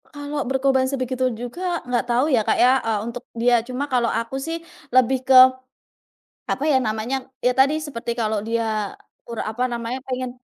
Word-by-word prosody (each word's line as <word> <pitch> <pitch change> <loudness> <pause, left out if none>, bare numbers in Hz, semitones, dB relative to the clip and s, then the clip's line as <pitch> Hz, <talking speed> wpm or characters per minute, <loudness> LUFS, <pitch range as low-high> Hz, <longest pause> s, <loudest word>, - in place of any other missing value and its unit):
Kalau 290 -1 -5
berkorban 265 -1 +2
sebegitu 255 -1 -1
juga, 345 +10 -3
nggak 245 -1 0
tau, 245 +3 +3
ya, 260 -7 +3
Kak, - - +1
ya, 250 +1 +5
eee, 225 -2 -1
untuk 235 +1 -6 0.2
dia. 240 0 +3
Cuma 255 +4 -4
kalau 250 -4 +1
aku, 250 +4 -3
sih, 325 +4 -3 0.3
lebih 255 +1 +3
ke 260 -1 +7 1.1
apa 275 - -2
ya 265 - +4
namanya. 245 +3 -2 0.2
Ya, 250 - +4
tadi 275 +5 +2
seperti 235 -5 -4
kalau 220 -2 0
dia, 220 -3 -1 0.3
ur 235 -1 -6
apa 220 +3 -3
namanya, 240 +1 -4
pengen 255 -1 -3
250 Hz, 170 wpm, -22 LUFS, 235-265 Hz, 1.1 s, ke